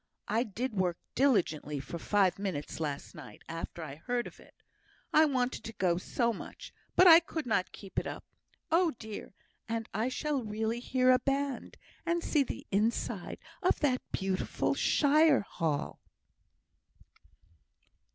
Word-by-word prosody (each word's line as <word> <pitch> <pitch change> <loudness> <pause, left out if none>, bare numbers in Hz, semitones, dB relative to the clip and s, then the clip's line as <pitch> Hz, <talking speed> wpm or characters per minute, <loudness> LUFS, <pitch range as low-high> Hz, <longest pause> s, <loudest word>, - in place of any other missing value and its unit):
I 220 +3 +2
did 240 +2 -3
work 180 -3 0 0.2
diligently 170 - +1
for 145 +5 -6
five 195 0 +2
minutes 180 -9 -4
last 145 -3 -4
night, 145 -5 -12
after 165 0 -6
I 145 -2 -7
heard 245 +8 -2
of - - -11
it, - - -18 0.6
I 315 - +7
wanted 255 -5 0
to 225 - -6
go 180 -5 +1
so 235 +5 0
much. - - -9 0.2
But 365 - +7
I 335 -2 +11
could 320 -2 -5
not 215 -6 0
keep 195 -2 -5
it - - -5
up. - - -7 0.5
Oh, 335 0 +4
dear! 215 -3 -8 0.3
and 225 -1 -2
I 220 +5 0
shall 290 +1 -1
really 220 +2 -2
hear 255 +1 +3
a 255 - +5
band! 275 0 -2 0.3
and 340 0 0
see 300 - +2
the 270 - -4
inside 215 +4 0 0.2
of - - +2
that 260 -4 +2
beautiful 190 -1 -1
shire 305 0 +4
hall!" 160 -7 -3
225 Hz, 150 wpm, -31 LUFS, 185-275 Hz, 0.6 s, I